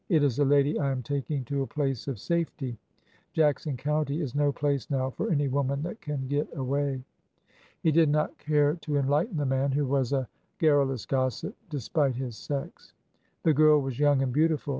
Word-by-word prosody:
'' - - -45
It 160 -6 +4
is 140 -2 +1
a 145 - +4
lady 140 +1 +3
I 140 -2 +1
am 130 -1 -3
taking 140 0 -2
to 140 +3 -2
a 135 - -2
place 135 -5 -2
of 135 -5 -3
safety. 150 - -2 0.6
Jackson 150 -3 +1
County 150 +2 -1
is 140 -7 -3
no 145 0 +2
place 140 -1 -1
now 130 -2 0
for - - -3
any 145 -3 +2
woman 140 +1 0
that 175 +7 -6
can 145 -3 -4
get 145 +2 0
away." 135 0 -1 0.8
He 160 - +4
did 160 0 +4
not 150 +1 +1
care 150 -1 +2
to 150 -3 -2
enlighten 150 - +1
the 145 - 0
man, 135 +1 +1
who 145 +1 +1
was 135 -2 0
a 135 -3 0 0.3
gar 155 -3 +4
rulous 135 -4 0
gossip, 130 -3 -1
despite 145 -1 0
his 125 -2 -4
sex. 140 +4 -6 0.5
The 160 - +4
girl 150 +1 +6
was 135 -2 -4
young 145 -2 +4
and 130 -2 -1
beautiful. 155 0 +1
140 Hz, 200 wpm, -28 LUFS, 135-150 Hz, 0.8 s, girl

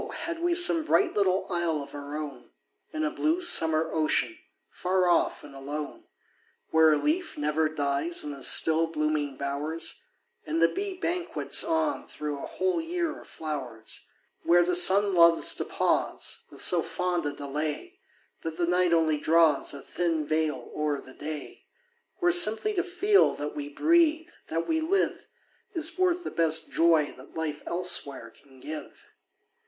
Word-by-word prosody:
had 335 -1 -4
we 345 0 +1
some 340 -2 +5
bright 360 +3 +2
little 190 -2 +1
isle 170 -3 -1
of - - -14
our 145 +1 -7
own, 150 -2 -8 0.4
In 310 0 -3
a 310 - -1
blue 325 +1 0
summer 160 - +3
ocean, 160 - 0 0.4
far 185 0 0
off 175 -1 +1
and 145 -1 -12
alone, 145 +2 -7 0.7
Where 160 0 +5
a - - +2
leaf 325 - -2
never 150 +1 0
dies 145 +2 -1
in 150 - -5
the 140 -1 -10
still 160 +4 +5
blooming 150 -3 -2
bowers, 145 +4 -4 0.4
And 160 +2 -3
the 165 - +5
bee 390 - -5
banquets 355 0 0
on 325 -3 -1
thro' 150 -2 -6
a - - -7
whole 370 -3 -1
year 335 -1 -3
of - - -17
flowers; 130 -8 -6 0.3
Where 175 +1 +4
the 180 +1 -1
sun 195 +3 +5
loves 170 -1 +6
to - - -3
pause - - -2
With - - -2
so - - +4
fond 180 -3 -2
a - - -2
delay, 150 - -5 0.4
That 160 0 -6
the 175 - 0
night 180 0 +1
only 160 -2 +2
draws 160 -2 +3
A 140 - -9
thin 165 -3 -2
veil 155 -4 -2
o'er 150 -2 -1
the 130 - -14
day; 150 +1 -8 0.5
Where 355 -1 +2
simply 350 - +4
to 365 - 0
feel 390 +3 +2
that 145 0 -6
we 145 -1 -5
breathe, 320 - +2 0.2
that 165 +1 -3
we 320 0 0
live, 390 +5 -1 0.5
Is 320 -1 0
worth 360 -1 +1
the - - -5
best 160 -1 +1
joy 165 -3 +2
that 130 - -16
life 155 -2 -4
elsewhere 140 -9 0
can 135 0 -21
give. 155 +4 -9
165 Hz, 165 wpm, -27 LUFS, -, 0.7 s, loves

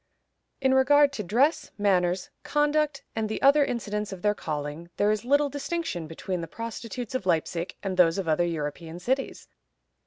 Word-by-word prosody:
In 265 -1 +3
regard 285 +2 +5
to 210 - -3
dress, 275 - +2
manners, 180 -3 +1
conduct, 295 0 +1
and 220 -1 -1
the 220 - -2
other 285 +2 +6
incidents 210 -5 -3
of 190 -1 -8
their 210 0 +3
calling, 150 -1 -5
there 205 +1 +3
is 215 0 -1
little 285 +3 +3
distinction 285 - -3
between 175 +3 -4
the 165 - -5
prostitutes 230 +4 -6
of 255 -7 -2
Leipzig 170 0 0
and 190 -2 -2
those 170 -1 +5
of 190 -3 -2
other 160 +2 +2
European 165 0 -4
cities. 260 +9 -2
210 Hz, 165 wpm, -27 LUFS, 175-270 Hz, -, other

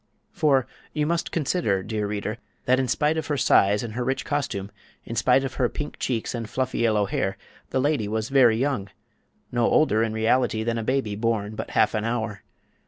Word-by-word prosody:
For 145 -8 +2 0.3
you 150 -1 0
must 170 +2 -1
consider, 140 - 0
dear 105 0 -2
reader, 105 +2 -3 0.3
that 130 +1 +3
in 130 - 0
spite 150 +6 +1
of 155 -2 -2
her 145 - 0
size 100 -4 +4
and 115 -2 -5
her 125 +2 -2
rich 130 +2 -1
costume, 130 -9 -2 0.3
in 115 - -5
spite 125 +3 +3
of 135 - -3
her 120 - +3
pink 150 - -6
cheeks 115 -4 -2
and 115 -2 -4
fluffy 130 -1 -2
yellow 110 -3 +3
hair, 95 0 -2 0.3
this 130 - 0
lady 145 -6 +1
was 110 +1 -2
very 125 -5 +5
young—no 120 -1 -4
older, 110 -8 +3
in 115 -1 +1
reality, 110 0 +1
than 115 0 -1
a - - -3
baby 130 -4 0
born 110 -1 -1
but - - -5
half 110 - +4
an 105 -1 -1
hour. 115 -3 -2
115 Hz, 195 wpm, -25 LUFS, 110-135 Hz, 0.3 s, very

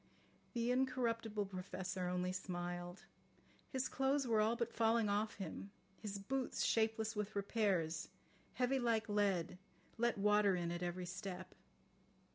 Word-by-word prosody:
The 235 0 +1
incorruptible 230 -5 +1
Professor 185 -1 -3
only 180 0 0
smiled. 175 -1 -4 0.7
His 260 -1 0
clothes 270 +1 +1
were 225 -3 +3
all 220 +2 +3
but 235 0 -2
falling 225 -1 +3
off 210 +2 +1
him, 195 +1 -5 0.3
his 205 -2 -3
boots, 255 +6 -1
shapeless 220 -1 +2
with 210 0 -2
repairs, 195 -6 +1 0.4
heavy 255 +1 +2
like 230 -3 +2
lead, 195 -4 +1 0.4
let 235 -1 +2
water 205 -1 +4
in 170 -1 -1
at 175 0 -3
every 180 +1 -2
step. 185 0 -6
205 Hz, 130 wpm, -39 LUFS, 185-230 Hz, 0.7 s, water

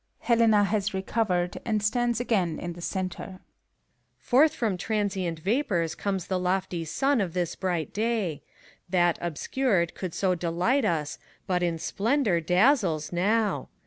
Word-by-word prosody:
(Helena 225 -3 +4
has 200 0 -1
recovered, 190 -2 -1
and 215 -3 -1
stands 240 +2 +1
again 190 -10 0
in 175 0 -5
the 175 - -11
centre.) 185 +1 -4
PH0RKTA8. - - -27 0.9
Forth 290 +5 +5
from 220 -5 0
transient 190 -4 -2
vapors 190 - 0
comes 195 -3 -3
the 185 -2 -1
lofty 180 -1 -1
sun 260 - +1
of 180 -3 -3
this 175 -2 -1
bright 175 -4 -2
day. 210 -9 -1 0.5
That, 175 -2 +2
obscured, 175 - 0
could 185 -4 -6
so 190 -2 +1
delight 180 +10 0
us, 155 -6 -1 0.3
but 180 -1 0
in 170 -2 0
splendor 210 - 0
dazzles 180 - +2
now. 210 +5 +1
190 Hz, 145 wpm, -27 LUFS, 175-220 Hz, 0.9 s, Forth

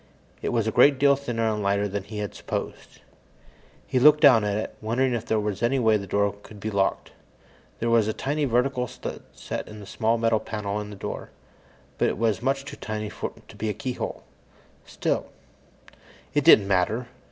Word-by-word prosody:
It - - -1
was 115 -3 +1
a 110 - 0
great 140 +5 +5
deal 140 +1 +5
thinner 120 -5 -2
and 105 -1 -1
lighter 100 +1 +1
than 100 0 -4
he 105 0 -8
had 105 -1 -4
supposed. - - -6 0.8
He 130 - 0
looked 150 +3 +7
down 130 -8 +7
at 105 0 0
it, 110 - -4
wondering 120 +4 +1
if 115 -2 -3
there 110 - +2
were 105 0 -1
any 120 +3 +2
way 110 -4 +4
the 100 -2 -3
door 100 +1 +1
could 105 0 -13
be 110 +2 -4
locked. 100 -1 0 0.7
There 115 - -2
was 115 -2 +4
a - - +1
tiny 145 +5 -1
vertical 125 0 +1
slit - - -7
set - - -6
in 105 0 -10
a 100 - -10
small 115 +3 0
metal 115 -1 +2
panel 105 -2 -4
in 105 - -7
the 105 - -8
door, - - -6 0.7
but - - +3
it - - -3
was 110 -2 +1
much 135 +2 0
too - - -8
tiny 105 -1 -4
to - - -8
be 110 - -3
a 105 - -2
keyhole. 125 +3 -4 0.6
Still - - -1 1.1
It 145 - +2
didn't 110 -10 +7
matter. 100 +6 +1
110 Hz, 195 wpm, -25 LUFS, 105-125 Hz, 1.1 s, looked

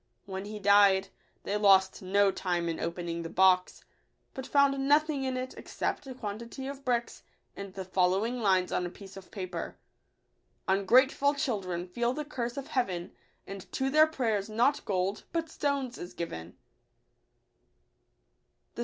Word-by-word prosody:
When 190 -1 -5
he 210 +1 -6
died, 200 -1 +5 0.3
they 205 - -1
lost 190 -2 +4
no 195 +1 +3
time 175 -3 -1
in 165 - -3
opening 170 0 -3
the 165 - -6
box; 185 0 +3 0.5
but 265 0 -6
found 275 -1 +3
nothing 295 -1 +3
in 260 -1 -1
1 255 - -1
it 255 - -8
except - - -4
a 260 - -7
quantity 235 +3 -6
of 275 0 -7
bricks, 240 -2 -1 0.3
and 200 -1 -7
the 190 -1 -5
following 190 +6 +1
■ - - -5
lines 190 -3 +2
on - - 0
a 175 - -3
piece 195 +1 -13
of 195 -1 -11
paper: 185 -5 -6 0.4
— - - -45
I 190 - +4
Ungrateful 260 +7 +4
children 190 -10 -2
feel 235 +7 -1
the 300 +2 -4
curse 240 -4 -4
of 275 - -6
Heaven; 185 -9 -1 0.3
And 195 -1 -9
to 265 0 0
their 310 +2 +6
prayers 225 -9 -1
not 240 +7 +2
gold, 195 +1 -1
but 325 -1 -2
stones, 280 -5 -2
is 180 +1 -8
given. 85 - -6
205 Hz, 160 wpm, -29 LUFS, 185-260 Hz, 0.5 s, their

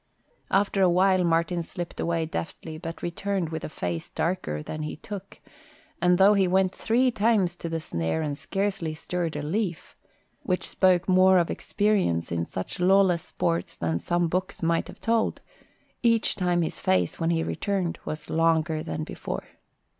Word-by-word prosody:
After 195 0 +2
a 185 - +6
while 185 +1 +4
Martin 170 +1 +1
slipped 175 +1 -7
away 165 -1 0
deftly 155 - -5
but 165 -1 -7
returned 180 0 -2
with 160 -1 -5
a - - -4
face 85 - -4
darker 75 - -2
than 155 - -5
he 150 - -4
took, 200 +4 -9 0.6
and 180 0 +4
though 195 +2 +7
he 195 -2 +3
went 190 +1 +2
three 250 +3 +2
times 210 -5 +2
to 170 - -5
the 165 0 -2
snare 85 - -2
and 145 -2 -2
scarcely 195 -1 -2
stirred 170 0 -3
a - - -3
leaf, 180 +1 -3 0.5
which 180 -1 -1
spoke 185 -1 +3
more 185 0 +6
of 170 -2 +2
experience 200 - 0
in 85 0 -1
such 95 - -6
lawless 185 -1 +4
sports 85 - -2
than 85 0 -1
some 175 - 0
books 185 +1 -3
might 165 0 +1
have - - -11
told, 225 -1 +1 0.6
each 230 -2 +3
time 175 -2 +1
his 160 - -4
face, 90 -2 +1
when 165 - +1
he 165 -1 +1
returned, 190 -3 -2
was 155 0 -5
longer 160 -1 +2
than 80 - -4
before. - - -5
175 Hz, 170 wpm, -26 LUFS, 155-190 Hz, 0.6 s, though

